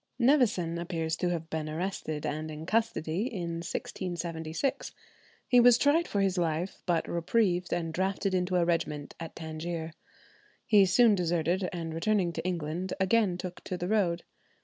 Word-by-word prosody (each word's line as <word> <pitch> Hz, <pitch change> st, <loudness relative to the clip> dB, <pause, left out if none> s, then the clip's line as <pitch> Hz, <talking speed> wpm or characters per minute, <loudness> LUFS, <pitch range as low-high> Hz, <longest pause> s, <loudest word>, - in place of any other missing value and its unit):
Nevison 225 Hz, -, +3 dB
appears 165 Hz, -2 st, -2 dB
to 180 Hz, -, 0 dB
have 165 Hz, -2 st, -3 dB
been 155 Hz, -1 st, -2 dB
arrested 155 Hz, -2 st, -3 dB
and 155 Hz, +1 st, -3 dB
in 155 Hz, +1 st, -7 dB
custody 215 Hz, -2 st, 0 dB
in 170 Hz, -5 st, -3 dB
1676. 170 Hz, -, -3 dB, 0.5 s
He 250 Hz, -, +6 dB
was 240 Hz, -1 st, +7 dB
tried 295 Hz, +6 st, +3 dB
for 200 Hz, -, 0 dB
his 195 Hz, -2 st, +1 dB
life, 170 Hz, +2 st, -1 dB
but 170 Hz, -2 st, +1 dB
reprieved 180 Hz, +1 st, +1 dB
and 165 Hz, -2 st, -1 dB
drafted 190 Hz, +2 st, 0 dB
into 180 Hz, 0 st, 0 dB
a 175 Hz, -1 st, +3 dB
regiment 150 Hz, -4 st, -1 dB
at 165 Hz, -1 st, -7 dB
Tangier. 160 Hz, 0 st, -5 dB, 0.7 s
He 205 Hz, -4 st, +6 dB
soon 225 Hz, +4 st, +5 dB
deserted, 175 Hz, 0 st, 0 dB
and 165 Hz, -2 st, -4 dB
returning 180 Hz, 0 st, +1 dB
to 165 Hz, -, -4 dB
England, 175 Hz, +1 st, -2 dB
again 190 Hz, -1 st, +2 dB
took 180 Hz, -1 st, -7 dB
to 180 Hz, -, -3 dB
the 175 Hz, -, -3 dB
road. 185 Hz, -5 st, +1 dB
175 Hz, 155 wpm, -29 LUFS, 165-195 Hz, 0.7 s, was